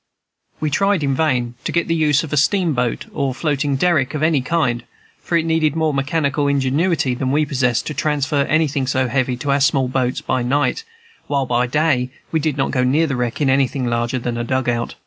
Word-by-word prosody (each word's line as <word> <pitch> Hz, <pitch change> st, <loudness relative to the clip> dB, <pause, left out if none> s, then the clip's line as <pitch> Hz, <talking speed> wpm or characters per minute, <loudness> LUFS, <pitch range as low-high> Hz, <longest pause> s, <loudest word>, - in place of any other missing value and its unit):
We 155 Hz, -1 st, -1 dB
tried 195 Hz, +1 st, +1 dB
in 140 Hz, -1 st, +1 dB
vain 130 Hz, -5 st, 0 dB
to -, -, -2 dB
get 170 Hz, -, 0 dB
the 165 Hz, -, +1 dB
use 155 Hz, -1 st, +2 dB
of 155 Hz, -, -6 dB
a -, -, +2 dB
steamboat 150 Hz, -, +1 dB
or 135 Hz, -2 st, -1 dB
floating 145 Hz, -2 st, -1 dB
derrick 155 Hz, -2 st, +1 dB
of 150 Hz, -, -2 dB
any 155 Hz, -4 st, +3 dB
kind; 125 Hz, -5 st, 0 dB, 0.4 s
for 170 Hz, -, 0 dB
it 165 Hz, -, 0 dB
needed 160 Hz, -2 st, +1 dB
more 160 Hz, -2 st, +1 dB
mechanical 140 Hz, +1 st, 0 dB
ingenuity 140 Hz, +1 st, +1 dB
than 130 Hz, +1 st, -2 dB
we 150 Hz, +2 st, +2 dB
possessed 125 Hz, -4 st, 0 dB
to 155 Hz, -, -4 dB
transfer 145 Hz, -1 st, 0 dB
anything 145 Hz, -4 st, +1 dB
so 130 Hz, 0 st, +1 dB
heavy 130 Hz, -1 st, 0 dB
to 140 Hz, +3 st, -2 dB
our 140 Hz, 0 st, +2 dB
small 135 Hz, -1 st, +2 dB
boats 125 Hz, -1 st, -1 dB
by 130 Hz, -, -1 dB
night, 145 Hz, -, 0 dB, 0.4 s
while 140 Hz, -2 st, 0 dB
by 125 Hz, 0 st, +1 dB
day 135 Hz, -2 st, +1 dB, 0.2 s
we 160 Hz, -, +1 dB
did 150 Hz, -2 st, -1 dB
not 135 Hz, -, 0 dB
go 125 Hz, -2 st, +1 dB
near 145 Hz, +6 st, +2 dB
the 140 Hz, -4 st, -2 dB
wreck 125 Hz, +2 st, -2 dB
in 145 Hz, -, +2 dB
anything 135 Hz, -1 st, +1 dB
larger 120 Hz, +1 st, -1 dB
than 120 Hz, -1 st, -3 dB
a -, -, -1 dB
"dug 130 Hz, +1 st, -1 dB
out." 120 Hz, -1 st, -1 dB
140 Hz, 215 wpm, -19 LUFS, 125-155 Hz, 0.4 s, any